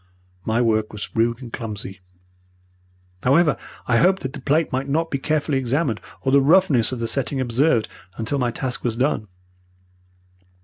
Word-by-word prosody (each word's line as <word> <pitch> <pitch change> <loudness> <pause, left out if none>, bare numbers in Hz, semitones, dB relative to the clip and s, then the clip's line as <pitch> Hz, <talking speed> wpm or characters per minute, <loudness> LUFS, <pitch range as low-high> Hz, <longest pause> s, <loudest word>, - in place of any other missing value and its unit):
My 115 +2 +1
work 110 -2 +1
was 105 -1 -7
rude 115 +2 +1
and 120 - -10
clumsy. 105 -4 -6 1.2
However, 150 +3 +4 0.3
I 120 - +3
hoped 190 +5 +3
that 130 0 -4
the 145 - -7
plate 150 +5 +1
might 135 +2 -2
not 165 +3 0
be 140 - -1
carefully 150 -1 0
examined, 130 -2 -1 0.2
or 135 - +1
the 140 0 +6
roughness 145 - +4
of 130 - -3
the 115 - -2
setting 135 +1 -1
observed, 120 - +2 0.3
until 115 +6 -1
my 125 -2 +1
task 125 +1 -4
was 115 -2 -1
done. 125 -5 0
130 Hz, 165 wpm, -22 LUFS, 115-145 Hz, 1.2 s, the